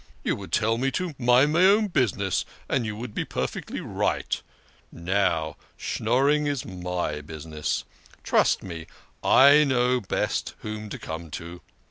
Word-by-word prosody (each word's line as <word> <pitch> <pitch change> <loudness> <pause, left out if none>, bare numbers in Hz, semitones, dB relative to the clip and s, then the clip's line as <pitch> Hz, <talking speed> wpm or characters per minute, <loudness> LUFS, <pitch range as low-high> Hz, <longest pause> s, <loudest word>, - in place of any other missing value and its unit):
You - - +1
would - - -9
tell 115 +2 +2
me 135 +2 +1
to 180 -3 -2
mind 125 +4 +4
my 170 +3 +4
own 205 +3 +6
business; 100 - +1 0.2
and 125 -5 0
you 105 - -4
would 115 0 -7
be - - -1
perfectly - - -4
right. - - -1 0.5
Now 85 -4 0 0.2
Schnorring 140 +6 +1
is 140 -3 -2
my 90 -5 -3
business. 75 0 -4 0.4
Trust - - +2
me, 85 -3 -7 0.4
I 140 +3 +7
know 125 -2 +2
best 95 - -2
whom 110 0 -6
to - - -5
come 80 +1 -7
to. 85 +1 -9
110 Hz, 145 wpm, -26 LUFS, 85-135 Hz, 0.5 s, I